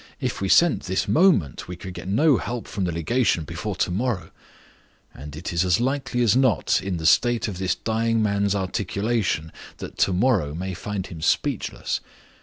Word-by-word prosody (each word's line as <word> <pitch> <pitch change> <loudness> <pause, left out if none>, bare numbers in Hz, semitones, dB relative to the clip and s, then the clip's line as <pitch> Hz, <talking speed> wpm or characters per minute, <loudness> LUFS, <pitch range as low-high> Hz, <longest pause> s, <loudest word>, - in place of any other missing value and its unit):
"If - - -3
we 95 - -1
sent 170 - +4
this 95 0 -1
moment, 105 - +2
we 90 - -6
could 90 +1 -8
get 90 - -8
no 140 +7 +4
help 120 -1 -5
from 100 -4 -3
the 85 - -1
legation 90 +2 +1
before - - -5
to - - 0
morrow; 110 +1 -2 0.8
and 70 +2 -9
it 85 +3 -5
is 85 +1 +2
as 90 +2 +2
likely 130 -1 0
as 115 -2 +4
not, 130 -3 +2
in 95 -2 -3
the 80 - -5
state 120 +7 +3
of 95 -4 -5
this 95 -1 0
dying 115 +1 0
man's 100 -1 +1
articulation, 100 -3 -1 0.3
that - - -9
to - - +3
morrow 90 - +1
may 95 +3 -4
find 95 +2 -4
him 85 -5 -9
speechless. - - -1
100 Hz, 185 wpm, -24 LUFS, 90-120 Hz, 0.8 s, sent